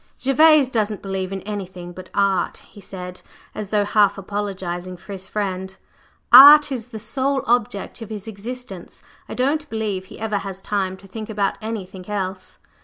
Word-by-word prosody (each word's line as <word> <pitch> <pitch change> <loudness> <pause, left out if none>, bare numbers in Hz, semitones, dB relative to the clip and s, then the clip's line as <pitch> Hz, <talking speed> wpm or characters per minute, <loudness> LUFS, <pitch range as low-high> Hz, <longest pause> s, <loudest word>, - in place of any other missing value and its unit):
"Gervase 295 +1 +5
doesn't 215 -4 -2
believe 190 -1 -3
in 195 -1 -4
anything 185 -4 -6
but 185 +1 -11
Art," 195 -3 +1
he 205 - -15
said, 180 -2 -8 0.3
as 210 -2 -6
though 205 -1 +1
half 205 -1 +3
apologizing 190 -3 -4
for 190 +3 -13
his 190 0 -7
friend: 190 -2 -4 0.6
"Art 290 +3 +10
is 245 -3 -4
the 235 -3 -8
sole 270 +3 -1
object 230 -2 -1
of 225 - -7
his 210 -1 -7
existence; 220 -2 -8 0.3
I - - -5
don't 290 +4 0
believe 210 -4 -3
he - - -13
ever 215 -2 -1
has 195 -1 -7
time 190 -2 -2
to 195 - -16
think 215 +3 -7
about 200 -2 -1
anything 195 -4 -6
else." 190 -2 -4
205 Hz, 170 wpm, -21 LUFS, 190-225 Hz, 0.6 s, Art